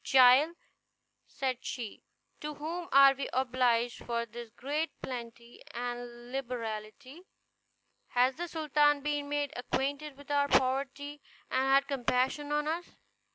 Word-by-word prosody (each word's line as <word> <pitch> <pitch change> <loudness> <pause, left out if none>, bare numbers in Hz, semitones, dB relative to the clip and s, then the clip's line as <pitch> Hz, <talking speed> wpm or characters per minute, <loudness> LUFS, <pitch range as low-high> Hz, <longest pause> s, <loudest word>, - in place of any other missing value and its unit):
"Child," 265 +5 +6 0.7
said 260 -2 -2
she, 230 -5 -5 0.4
"to 300 0 -5
whom 335 +4 -5
are 275 0 +8
we 275 +1 -4
obliged 245 -2 +1
for 235 -1 -1
this 235 0 -9
great 290 +7 -2
plenty 235 -1 -7
and 240 0 -5
liberality? 250 +2 -5 0.9
Has 250 +2 +3
the 345 +5 -5
sultan 295 -3 +2
been 290 -1 -1
made 290 -1 -1
acquainted 280 +3 -2
with 285 0 -10
our 285 0 +3
poverty, 275 +2 0 0.3
and 265 +1 +2
had 275 +1 +4
compassion 265 +2 0
on 295 0 +1
us?" 335 +3 -3
270 Hz, 125 wpm, -31 LUFS, 245-290 Hz, 0.9 s, are